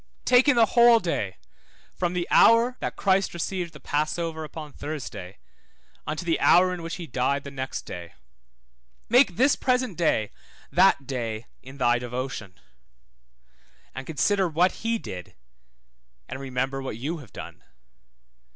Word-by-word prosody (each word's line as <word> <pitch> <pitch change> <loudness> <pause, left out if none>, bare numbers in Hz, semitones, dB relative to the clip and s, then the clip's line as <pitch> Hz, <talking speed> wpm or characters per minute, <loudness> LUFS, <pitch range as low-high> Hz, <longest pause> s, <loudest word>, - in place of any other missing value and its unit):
Take 250 +2 +5
in 285 - +5
the 230 -1 +6
whole 235 -1 +7
day 135 - -3 0.6
from 175 -1 -2
the 175 -1 -2
hour 230 +2 +6
that - - -4
Christ 195 -2 +1
received 175 0 -3
the 150 - -13
passover 160 +2 -2
upon 155 -1 -8
Thursday 140 -11 -7 0.7
unto 155 +3 -3
the 165 -1 +1
hour 180 +1 +5
in 180 - -6
which 165 0 -5
he 175 - -7
died 140 +1 -1
the 140 - -8
next 130 -1 -5
day. 85 -1 -9 0.9
Make 240 -6 +5
this 265 +4 +4
present 250 -8 0
day 110 -10 +1 0.4
that 140 - +4
day 115 -4 -4 0.2
in 130 +2 -12
thy 120 -2 +2
devotion, 125 -6 -6 1.3
and 135 0 -7
consider 190 +5 +1
what 175 +3 +1
he 230 0 +1
did, 90 - -9 0.9
and 130 - -6
remember 135 0 -2
what 130 -5 -5
you 155 +8 -4
have 125 -10 -14
done. - - -10
155 Hz, 145 wpm, -25 LUFS, 130-185 Hz, 1.3 s, whole